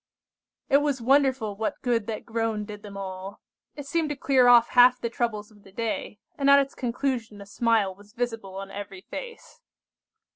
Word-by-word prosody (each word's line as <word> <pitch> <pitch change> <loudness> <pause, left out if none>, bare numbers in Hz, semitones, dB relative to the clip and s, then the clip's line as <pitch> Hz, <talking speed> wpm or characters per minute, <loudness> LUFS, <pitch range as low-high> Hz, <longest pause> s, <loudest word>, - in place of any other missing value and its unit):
It 275 - +5
was 290 -2 0
wonderful 260 -4 +2
what 220 +1 -4
good 235 -4 0
that 220 -2 -5
groan 225 -2 -2
did 210 -1 -9
them 205 -2 -10
all! 190 0 -7 0.4
It 290 - -8
seemed 320 +1 -1
to 295 - -2
clear 265 -2 +3
off 240 -1 +7
half 250 0 +6
the 235 - -3
troubles 220 -3 -3
of 205 -1 -20
the 195 - -17
day, 220 0 -4 0.2
and 280 0 +3
at 280 - +8
its 275 0 +1
conclusion 240 -3 -3
a 200 - -10
smile 215 -2 +1
was 205 +2 -19
visible 225 -5 -4
on 195 0 -7
every 195 -2 -8
face. 485 - -9
230 Hz, 185 wpm, -26 LUFS, 205-260 Hz, 0.4 s, at